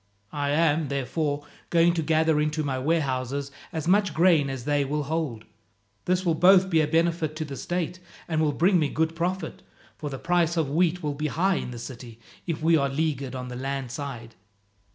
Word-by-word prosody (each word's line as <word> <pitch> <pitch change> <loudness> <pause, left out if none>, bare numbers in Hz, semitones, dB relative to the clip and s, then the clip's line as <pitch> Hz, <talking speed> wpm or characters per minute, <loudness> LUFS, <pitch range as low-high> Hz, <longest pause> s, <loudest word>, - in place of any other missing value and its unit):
I 145 -1 -1
am, 155 0 +2
therefore, 145 +2 -2 0.2
going 170 0 +4
to 170 - 0
gather 160 -1 +2
into 155 +1 0
my 135 -3 -2
warehouses 140 -2 -1 0.2
as 160 -3 -4
much 195 -2 +3
grain 165 -5 +4
as 130 -3 -5
they 145 -1 +2
will 150 +2 -2
hold. 145 -7 -3 0.6
This 185 +1 +1
will 170 - +3
both 190 +3 +5
be 160 -1 +4
a 150 - +1
benefit 165 -1 +1
to 155 0 -3
the 140 -2 -7
state, 175 +3 -3 0.3
and 160 -2 0
will 155 -2 +2
bring 175 +5 +3
me 150 -3 +1
good 160 +2 0
profit, 180 +3 -3 0.4
for 150 - -4
the 135 - -5
price 170 +1 +1
of 155 -4 0
wheat 175 +2 +1
will 150 -1 -1
be 150 +2 -2
high 180 +6 +1
in - - -4
the 120 - -7
city 115 -1 -9 0.3
if 160 -3 -3
we 165 +1 +5
are 140 -2 +1
leaguered 140 -3 -2
on 125 -1 -5
the 125 - -6
land 135 -1 -4
side. 130 -5 -6
155 Hz, 200 wpm, -26 LUFS, 140-165 Hz, 0.6 s, both